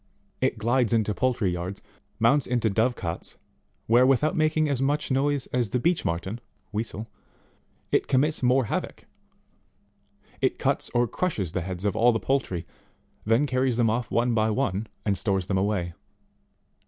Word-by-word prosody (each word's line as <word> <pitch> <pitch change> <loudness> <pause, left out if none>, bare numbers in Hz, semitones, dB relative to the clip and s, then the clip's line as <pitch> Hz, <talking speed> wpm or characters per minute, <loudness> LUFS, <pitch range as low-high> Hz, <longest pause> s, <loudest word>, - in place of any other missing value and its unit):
It 130 -2 +1
glides 120 +2 +2
into 110 -2 +2
poultry 120 -5 0
yards, 90 +3 -5 0.3
mounts 125 +6 +3
into 120 -3 +1
dove 115 +5 +2
cots, 85 -5 -5 0.5
where, 120 +3 +5
without 135 +4 +3
making 155 0 +2
as 140 -3 -1
much 145 +1 0
noise 140 0 +1
as 120 -4 +1
the 125 - 0
Beech 170 +6 +1
Marten, 95 +7 -3 0.3
(Weasel,) 110 0 -4 0.8
it - - +2
commits 150 +4 +2
more 130 +1 +3
havoc; - - -4 1.4
it - - +1
cuts - - 0
or 120 0 +3
crushes 110 - -2
the 90 - -2
heads 90 +2 -4
of 100 - +1
all 120 +2 +5
the 115 - 0
poultry, 100 -12 -1 0.6
then 115 +6 +4
carries 130 -2 0
them 115 -2 +3
off 115 -1 -2
one 120 +1 +1
by 110 -1 +2
one, 110 -3 -1 0.2
and 100 -2 +2
stores 95 0 0
them 95 0 0
away. 95 -4 -1
115 Hz, 160 wpm, -26 LUFS, 100-130 Hz, 1.4 s, where